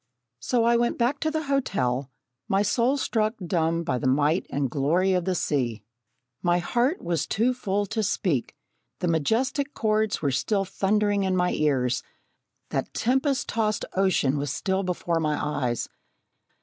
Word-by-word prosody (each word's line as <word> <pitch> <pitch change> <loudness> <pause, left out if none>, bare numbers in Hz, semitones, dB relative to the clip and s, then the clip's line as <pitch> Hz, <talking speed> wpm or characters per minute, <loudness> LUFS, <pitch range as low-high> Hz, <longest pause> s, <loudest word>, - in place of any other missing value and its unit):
So 240 - +1
I 235 +1 +4
went 235 0 0
back 255 +4 +1
to 315 - 0
the 315 0 -2
hotel, 140 - 0 0.4
my 195 +1 +2
soul 240 +6 +2
struck 220 -4 0
dumb 170 -3 0
by 130 -6 -1
the 130 - -1
might 150 +6 +2
and 140 -1 0
glory 160 +9 +1
of 180 -2 0
the 185 - 0
sea. 120 - -1 0.6
My 175 0 +2
heart 245 - 0
was 170 -3 -1
too 235 +5 +1
full 205 -4 -1
to 220 +2 -2
speak. 175 - -1 0.4
The 180 - -2
majestic 240 - 0
chords 215 -1 +1
were 140 -3 0
still 195 - 0
thundering 205 +2 +1
in 190 -1 +1
my 180 0 +2
ears; 130 -4 +1 0.7
that - - -3
tempest 265 +3 +1
tossed 215 -2 0
ocean 180 -8 +2
was 145 -1 -2
still 190 0 -1
before 175 -2 -1
my 150 -2 0
eyes. 140 -5 -1
190 Hz, 160 wpm, -26 LUFS, 150-225 Hz, 0.7 s, I